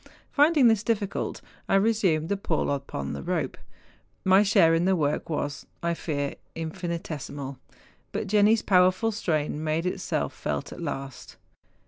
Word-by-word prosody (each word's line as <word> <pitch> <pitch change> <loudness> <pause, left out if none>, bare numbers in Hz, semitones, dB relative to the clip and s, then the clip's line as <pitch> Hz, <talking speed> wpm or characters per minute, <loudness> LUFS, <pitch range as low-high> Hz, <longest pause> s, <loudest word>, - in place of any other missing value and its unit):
Finding 295 -3 +5
this 225 -3 +4
difficult, 210 -3 -2 0.3
I - - +4
resumed 195 -7 +2
the 200 - +2
pull 170 -7 -1
upon 135 - -3
the 70 - -5
rope. - - -2 0.7
My 190 +1 +6
share 170 -5 +5
in 165 +1 +2
the 190 0 +3
work 150 -2 -1
was, 145 -2 -3 0.2
I 170 0 +1
fear, 145 -4 -3 0.2
infinitesimal; 160 -5 -5 0.5
but - - -2
Jenni's 210 +2 +4
powerful 185 +4 +4
strain 155 -7 -1
made 160 +2 0
itself 180 - -2
felt 70 -1 -4
at - - -9
last. 140 -4 -6
170 Hz, 140 wpm, -26 LUFS, 150-200 Hz, 0.7 s, My